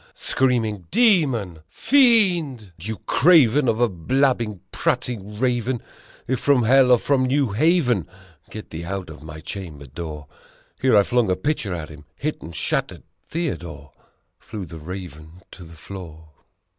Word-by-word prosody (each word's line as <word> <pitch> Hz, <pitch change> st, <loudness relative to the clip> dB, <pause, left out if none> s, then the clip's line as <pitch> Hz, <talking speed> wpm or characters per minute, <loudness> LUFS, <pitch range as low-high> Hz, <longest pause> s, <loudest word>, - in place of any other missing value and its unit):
Screaming, 110 Hz, -8 st, 0 dB
"Demon! 135 Hz, -, +2 dB
Fiend! 190 Hz, -, +3 dB
You 110 Hz, +5 st, -5 dB
Craven 145 Hz, -4 st, +5 dB
of 115 Hz, -1 st, +1 dB
a 120 Hz, -, +4 dB
blab 125 Hz, -, +1 dB
bing, 105 Hz, -6 st, -5 dB
prating 105 Hz, -4 st, -2 dB
Raven! 125 Hz, -1 st, 0 dB, 0.5 s
If 130 Hz, -1 st, 0 dB
from 140 Hz, -3 st, +3 dB
hell 130 Hz, +2 st, +5 dB
or 125 Hz, -, +7 dB
from 130 Hz, +1 st, +1 dB
New 135 Hz, -3 st, +1 dB
Haven, 125 Hz, -, +2 dB, 0.4 s
get 110 Hz, -, -9 dB
thee 80 Hz, +1 st, -6 dB
out 85 Hz, -5 st, -6 dB
my 80 Hz, 0 st, -9 dB
chamber 80 Hz, -6 st, -8 dB
door!" 75 Hz, +2 st, -7 dB, 0.6 s
Here 130 Hz, -5 st, +4 dB
I 100 Hz, -, +6 dB
flung 120 Hz, -1 st, +1 dB
a 90 Hz, -, +2 dB
pitcher 100 Hz, -, -2 dB
at 80 Hz, -2 st, -6 dB
him, 75 Hz, -2 st, -13 dB
hit 155 Hz, -, -4 dB
and 85 Hz, 0 st, -9 dB
shattered -, -, -2 dB, 0.3 s
Theodore! 85 Hz, -, -5 dB, 0.5 s
Flew 105 Hz, -4 st, -7 dB
the 80 Hz, 0 st, -10 dB
Raven 85 Hz, 0 st, -9 dB
to 90 Hz, -, -11 dB
the 85 Hz, 0 st, -13 dB
floor. 80 Hz, -4 st, -10 dB
110 Hz, 145 wpm, -22 LUFS, 85-130 Hz, 0.6 s, or